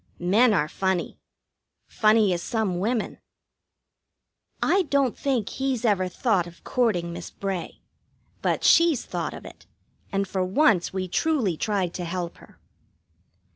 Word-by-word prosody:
Men 210 +8 +4
are 155 -7 +2
funny 190 +1 -2 0.7
funny 215 -3 +3
as 170 - -2
some 210 -5 -1
women. 220 +3 -2 1.4
I 390 - +3
don't 275 -4 +2
think 255 -7 -1
he's 265 -3 -2
ever 195 -4 +2
thought 185 -1 0
of 170 +1 -15
courting 180 -9 0
Miss 170 -1 -7
Bray. 195 -3 -5 0.6
But - - 0
she's 335 -6 +4
thought - - -4
of - - -11
it, - - -13 0.4
and 195 -1 0
for 185 0 -1
once 190 - +2
we 185 -1 -3
truly 235 - 0
tried 190 -1 -1
to 180 - -4
help 175 0 -4
her. - - -18
195 Hz, 135 wpm, -25 LUFS, 180-240 Hz, 1.4 s, Men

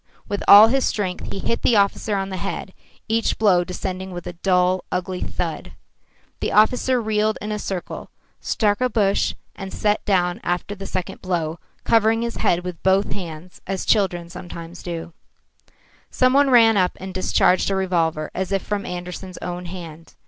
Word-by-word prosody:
With 205 - -3
all 210 +2 +10
his 265 +2 +2
strength 185 -4 -2
he - - -4
hit 230 +4 -2
the 235 - +3
officer 200 +1 +2
on 195 0 -2
the 190 - -4
head, 190 0 -5 0.3
each 225 +1 0
blow 190 -5 +4
descending 185 +1 -5
with 175 -2 -7
a - - -5
dull, 180 +1 +1
ugly 180 0 -3
thud. - - -4 0.7
The - - -2
officer 250 +4 +3
reeled 215 -1 0
in 210 - -5
a 210 - -2
circle, 190 -3 -5 0.3
struck 205 0 0
a 255 - +2
bush, 205 -4 +1 0.2
and 195 -1 -7
sat 210 0 0
down 180 -3 +1
after 175 +3 -2
the 195 -1 -7
second 185 -2 -4
blow, 170 -3 -2 0.2
covering 225 0 +3
his 235 -1 -4
head 175 - +1
with 180 -2 -6
both 190 +1 +2
hands, 175 -2 -8
as 190 -1 -3
children 180 -5 +1 0.6
do. 170 -1 -6 1.0
Some 255 0 +2
one 280 0 +4
ran 225 -4 +6
up 180 -1 +1
and 190 0 -7
discharged 185 0 +2
a 195 - 0
revolver 165 -5 0
as 190 0 -3
if 195 -2 0
from 205 -1 -3
Andersen's 180 +1 -6
own 180 0 -5
hand. 165 -2 -9
190 Hz, 170 wpm, -22 LUFS, 180-210 Hz, 1.0 s, all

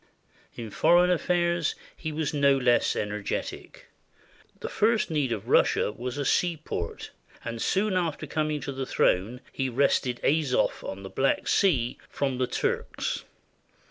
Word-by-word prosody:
In 115 -3 -7
foreign 175 - +4
affairs 175 -1 +1 0.2
he 155 - -5
was 155 -1 -2
no 140 -1 +4
less 125 -2 +2
energetic. 105 -1 -4 0.7
The - - -5
first 220 -4 +1
need 145 -5 0
of 110 -4 -3
Russia - - +3
was 125 +4 -5
a 145 - -2
seaport, 160 - -1 0.3
and 115 -1 -4
soon 195 0 +1
after 170 -4 -1
coming 155 -1 -1
to - - -4
the 135 -1 -4
throne 110 +8 +1
he 135 - -2
had 125 -2 -4
wrested 130 -3 +2
Azov 145 -4 +1
on 95 +1 -6
the 95 - -7
Black 135 0 +1
Sea 130 -11 +2
from 135 -3 -2
the 130 - +1
Turks. - - -2
140 Hz, 145 wpm, -27 LUFS, 120-160 Hz, 0.7 s, foreign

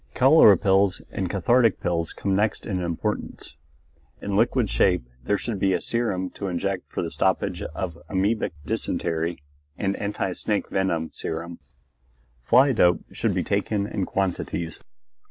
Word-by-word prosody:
Cholera 130 - +7
pills 95 0 +2
and 95 -2 -3
cathartic 115 +4 +3
pills 85 -1 0
come 100 -1 -1
next 105 +2 0
in 95 -4 -2
importance. 85 -2 -4 0.6
In 100 - -3
liquid 120 +2 +2
shape 90 -6 +2 0.2
there 105 - +2
should 110 -2 -4
be 95 0 +2
serum 100 -6 -1
to 100 - -5
inject 95 +1 -3
for - - -2
the - - -4
stoppage - - 0
of 85 -3 -5
amoebic 100 +2 0
dysentery, 80 -1 -2 0.3
and 100 0 -1
anti 100 -2 -2
snake 105 +3 -2
venom 85 -4 0
serum. 85 +1 -5 0.8
Fly 130 - +5
dope 90 -7 +3
should - - -1
be - - 0
taken 105 -2 0
in 100 -2 -3
quantities. 85 -3 -2
95 Hz, 140 wpm, -24 LUFS, 90-105 Hz, 0.8 s, Cholera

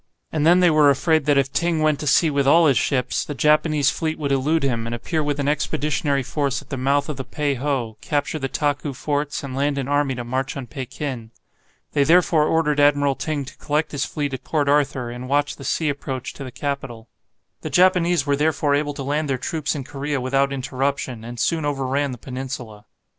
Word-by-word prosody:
And 155 0 +1
then 175 +2 +6
they 175 -2 +5
were 155 -2 +5
afraid 145 +2 +2
that 145 -1 +3
if 135 0 +1
Ting 170 +1 +1
went 155 -2 +2
to 150 - -4
sea 155 +3 +4
with 140 -1 +1
all 165 +4 +6
his 140 -5 +4
ships, 130 -3 0
the 145 - -6
Japanese 150 -1 +3
fleet 160 -1 -2
would 145 -2 -2
elude 145 +4 +1
him, 115 -4 -1
and 115 - -3
appear 160 +7 -2
with 145 -1 -2
an 140 - -1
expeditionary 145 -1 0
force 140 +1 -1
at - - -16
the - - -1
mouth 140 +2 +1
of 150 -4 -4
the 135 - -4
Pei 145 +3 -1
ho, 130 -4 -2
capture 150 +1 -1
the 135 - -2
Taku 145 +1 -1
forts, 145 +2 -2
and 135 -2 -6
land 140 +1 0
an 135 -2 -2
army 145 -2 +1
to 120 - -4
march 130 +4 -3
on 135 - -5
Pekin. 130 -2 -6 0.6
They 145 - +3
therefore 165 -1 +4
ordered 150 -2 +1
Admiral 145 -1 +4
Ting 145 0 -3
to - - -12
collect 150 +1 -1
his 145 - -1
fleet 145 -2 -3
at 130 - -5
Port 150 -3 0
Arthur, 140 -4 +1
and 125 +1 -7
watch 145 +1 +1
the 140 - -10
sea 160 +3 0
approach 140 -3 -4
to 140 - -8
the 130 - -6
capital. 135 -4 -5 0.5
The - - -4
Japanese 180 -4 +3
were 145 -1 +2
therefore 150 0 +1
able 145 0 0
to 140 - -5
land 145 +2 -1
their 135 - +1
troops 155 +4 -2
in 140 - -4
Korea 140 +1 -3
without 135 +2 +1
interruption, 135 -3 -2
and 120 +1 -8
soon 165 +4 +1
overran 140 -1 -1
the 125 - -6
peninsula. 125 -4 -7
145 Hz, 215 wpm, -22 LUFS, 135-150 Hz, 0.6 s, then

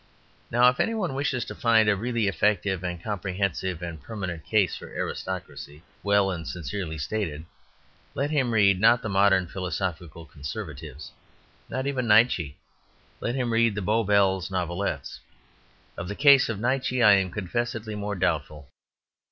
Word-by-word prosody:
Now 120 +1 +5
if 125 - -3
any 225 - +1
one 185 -10 -2
wishes 135 -3 -1
to - - -7
find 110 -2 +3
a 105 - +4
really 115 +1 -1
effective 100 -2 +1
and 90 -1 -4
comprehensible 95 -3 -2
and 80 -3 -8
permanent 90 -4 -6
case 105 -5 +1
for - - -9
aristocracy 75 +3 -6 0.2
well 100 -1 +2
and 85 -3 -5
sincerely 90 -2 -5
stated, 80 -2 -3 0.7
let 140 +3 -1
him 135 -5 +1
read, 100 -4 +4
not 115 +2 +5
the 110 - -3
modern 95 -1 +4
philosophical 90 -2 -4
conservatives, 70 -1 -8 0.6
not 130 +1 -3
even 130 -3 -1
Nietzsche, 105 - +3 0.6
let 120 - -2
him 125 -3 -1
read 115 -2 +3
the 105 - -3
Bow 110 +4 +2
Bells 95 -3 +2
Novelettes. 85 -5 -3 0.8
Of 85 - -6
the 100 - -5
case 140 -1 +6
of 110 -3 -3
Nietzsche 125 +1 0
I 105 - +8
am 95 -2 +3
confessedly 110 +3 -3
more 105 0 -3
doubtful. 75 -5 -2
100 Hz, 150 wpm, -26 LUFS, 90-115 Hz, 0.8 s, I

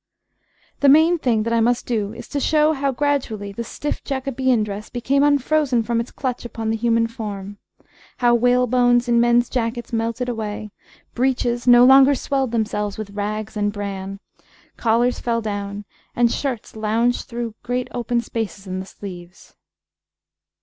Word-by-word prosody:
The 285 - +5
main 320 +4 +5
thing 230 -6 +1
that 230 +1 -1
I 230 - +3
must 240 +1 +1
do 215 -4 -1
is 230 +2 -10
to 290 - -2
show 305 +2 +3
how, 275 -1 0
gradually, 250 -7 -1
the 235 +4 -5
stiff 295 +5 -5
Jacobean 260 -3 0
dress 210 0 -6
became 260 +3 0
unfrozen 285 -3 +2
from 230 +1 0
its 235 - -3
clutch 255 -3 -4
upon 225 -2 -4
the - - 0
human 230 0 +2
form, 205 -4 -6 0.6
how 240 -1 +3
whalebones 245 0 +3
in 235 -1 +3
men's 240 0 +3
jackets 240 -1 -3
melted 230 +2 -1
away, 215 -3 -4 0.4
breeches 245 -1 0
no 245 0 +8
longer 270 +2 +7
swelled 270 0 -1
themselves 210 -3 -2
with 215 -2 -6
rags 210 +2 -4
and 205 0 0
bran, 195 -1 -5 0.6
collars 235 +2 +1
fell 230 -1 0
down, 205 -1 -4 0.3
and 240 -1 +3
shirts 255 -7 -4
lounged 225 +3 0
through 235 -3 -4
great 245 +1 -2
open 240 -1 -1
spaces 220 -4 -5
in 185 0 -4
the 190 - -7
sleeves. 180 -3 -11
235 Hz, 155 wpm, -21 LUFS, 215-250 Hz, 0.6 s, no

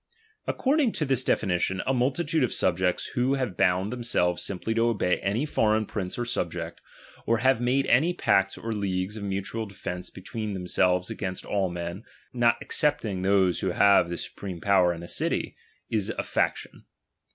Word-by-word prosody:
According 275 -3 +1
to 155 - -1
tliis 135 -2 +2
definition, 95 -3 0
a 135 - +1
multitude 145 +5 +1
of 125 - +1
subjects 90 0 +1
who 125 +2 +2
have 125 -9 -2
bound 95 +3 +2
themselves 100 -8 0
simply 100 +4 -2
to 115 +1 +2
obey 100 -6 +1
any 105 +9 0
foreign 110 -6 +2
prince 95 -3 -4
or 120 - -1
subject, 85 -6 -3 0.5
or 115 - +3
have 130 0 +2
made 130 +3 +2
any 155 +8 +4
pacts 95 - +2
or 115 - -5
leagues 95 -1 -2
of 110 - -6
mutual 100 +3 -3
defence 90 -2 -6
between 105 +2 -5
themselves 90 0 +1
against 95 -2 -4
all 100 -2 0
men, 85 +2 -5 0.3
not 120 -1 +3
excepting 110 - 0
those 95 -2 +3
who 95 - -1
have 100 -3 +5
the 85 - -3
supreme 95 -4 -7
power 95 -2 +4
in 85 -1 -6
the 85 - -8
city, - - -1 0.4
is 105 -3 0
a - - -2
faction. - - -2
100 Hz, 170 wpm, -27 LUFS, 90-120 Hz, 0.5 s, have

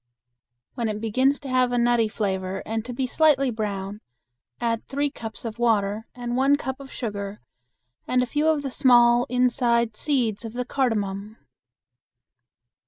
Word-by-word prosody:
When 235 -2 -2
it 210 0 -3
begins 255 +6 +2
to 280 - -8
have 255 -1 +2
a 245 - +1
nutty 240 -1 +3
flavor 190 -3 -3
and 225 0 -2
to 250 - -5
be 255 +2 -2
slightly 275 -1 +3
brown, 205 -2 -4 0.6
add 230 -1 -1
three 285 +1 -1
cups 225 -1 -8
of 230 0 -5
water 220 -2 +1
and 240 -1 -4
one 270 +2 +4
cup 265 -1 -4
of 275 -1 -11
sugar 205 -3 -5 0.7
and 250 0 +2
a - - 0
few 295 +5 0
of 310 -2 +2
the 270 - -3
small 240 -2 +5
inside 240 -2 +2
seeds 240 -6 0
of 225 -1 -7
the 250 0 -3
cardamon. 215 -5 -1
240 Hz, 160 wpm, -24 LUFS, 215-255 Hz, 0.7 s, small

